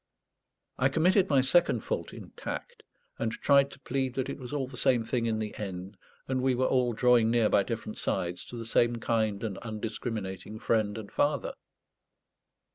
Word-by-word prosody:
I 130 - +4
committed 180 +6 +3
my 140 -3 +5
second 135 -3 +3
fault - - -3
in - - -10
tact, - - -6 0.4
and 115 -1 0
tried 140 -1 +4
to - - -13
plead 130 -1 -2
that 130 -1 -1
it - - -7
was 125 -2 -8
all 145 -2 -1
the 130 0 -11
same 125 -1 +2
thing 115 0 -1
in 110 -1 0
the 110 -1 -4
end, 95 -1 -5 0.3
and 130 -1 0
we 130 -1 +2
were 130 +1 +1
all 125 -2 +2
drawing 120 -1 +4
near 115 -2 +3
by - - +4
different - - -5
sides 90 0 -1
to - - -9
the 115 - -5
same 120 +1 +2
kind 110 -3 0
and 105 -4 -3
undiscriminating 110 -3 -5
Friend 110 -1 0
and 110 -2 -8
Father. 145 +1 0
120 Hz, 185 wpm, -29 LUFS, 110-130 Hz, 0.4 s, my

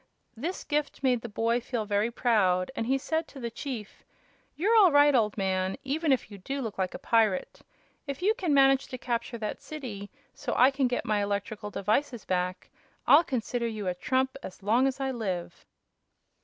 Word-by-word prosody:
This 325 +11 -4
gift 295 -2 -2
made 250 -3 +2
the 235 - -7
boy 230 +3 0
feel 235 -2 -3
very 205 +2 +1
proud, 205 -6 +2
and 225 -4 -2
he 265 +2 +2
said 320 +4 -2
to 275 - -12
the 235 -2 -4
chief: 235 -3 -7 0.5
"You're 415 +8 +2
all 400 -6 +7
right, 290 0 +6
old 220 -5 +2
man, 190 -1 0
even 300 +3 0
if 255 -4 0
you 200 - -9
do 270 +9 -4
look 225 -7 -5
like 185 -1 -1
a - - -3
pirate. 220 -5 +1 0.5
If 280 +4 -5
you 420 +3 +4
can 370 -9 -2
manage 270 -1 +4
to 255 - -6
capture 235 0 -3
that 215 -2 -4
city, 230 -10 -7 0.2
so 270 -4 -4
I 255 +3 +6
can 270 -1 +1
get 245 0 -2
my 210 -1 +1
electrical 205 +1 -3
devices 215 +4 -1
back, 180 0 -2 0.3
I'll 300 +4 +7
consider 240 -3 -2
you 215 -3 -4
a 180 - +1
trump 260 +8 0
as 190 - -10
long 235 +6 +3
as 270 0 -3
I 270 -1 -1
live." 185 -8 -4
240 Hz, 195 wpm, -28 LUFS, 205-275 Hz, 0.5 s, all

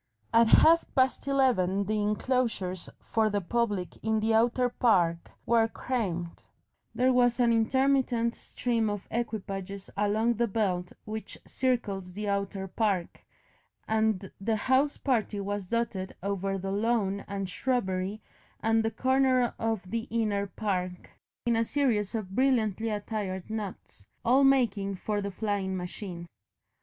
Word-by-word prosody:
At 230 0 +6
half 330 +8 +6
past 260 +1 +2
eleven 230 -9 +2
the 215 +1 0
enclosures 210 -4 -1
for 220 -1 +1
the 205 -1 0
public 205 -1 -1
in 220 0 +1
the 220 +1 +1
outer 240 +3 +3
park 180 -9 +2 0.2
were 230 -1 +4
crammed, 190 -9 -3 0.5
there 255 +1 +3
was 245 -1 +3
an 235 -1 +4
intermittent 245 0 +2
stream 230 -3 -1
of 205 -2 -4
equipages 200 -4 -4
along 215 +3 +2
the 235 +1 +2
belt 190 -4 -1
which 220 0 -6
circles 205 -8 -1
the 210 +2 -4
outer 200 -1 -2
park, 190 -3 -1 0.7
and 220 -3 0
the 220 +2 +1
house 260 +6 +2
party 220 -6 0
was 200 -1 -3
dotted 220 -5 -2
over 195 0 -1
the 195 +1 -4
lawn 200 -2 0
and 195 -1 -3
shrubbery 195 -2 -1 0.4
and 225 0 +2
the 225 - +1
corner 255 +1 +2
of 225 -3 -1
the 230 +1 -2
inner 210 -3 0
park, 185 -3 -3 0.3
in 235 -1 +2
a 225 - +3
series 230 -5 0
of 200 -4 -4
brilliantly 225 -4 +1
attired 205 -2 -4
knots, 200 - -7 0.2
all 260 +4 +5
making 220 -8 +3
for 205 +2 -2
the 200 - -3
flying 195 -1 -2
machine. 180 -1 -6
215 Hz, 135 wpm, -29 LUFS, 195-235 Hz, 0.7 s, At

